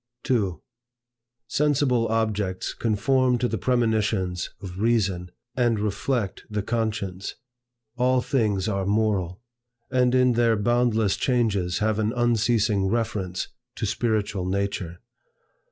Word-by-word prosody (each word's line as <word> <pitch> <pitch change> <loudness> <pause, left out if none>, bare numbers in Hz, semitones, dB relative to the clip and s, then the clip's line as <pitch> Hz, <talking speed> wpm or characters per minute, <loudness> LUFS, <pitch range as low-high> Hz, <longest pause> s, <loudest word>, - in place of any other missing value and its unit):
2. 100 -10 0 0.9
Sensible 140 -5 +2
objects 105 -4 -1
conform 125 +3 +2
to 125 +1 0
the 110 -3 -3
premonitions 110 -7 0
of 95 -1 -8
Reason 100 -6 +1 0.3
and 120 -3 +2
reflect 105 +1 -2
the 105 -1 -2
conscience. 105 -5 -2 0.6
All 130 0 +3
things 105 -7 0
are 100 -3 -1
moral; 100 -2 0 0.5
and 125 -1 +3
in 125 -1 +4
their 115 -1 +3
boundless 110 -1 +2
changes 100 -9 +1
have 110 -1 +1
an 110 +1 0
unceasing 115 -4 +2
reference 100 -5 -2 0.3
to - - -2
spiritual 105 -3 -1
nature. 95 -3 -2
110 Hz, 110 wpm, -25 LUFS, 100-120 Hz, 0.9 s, in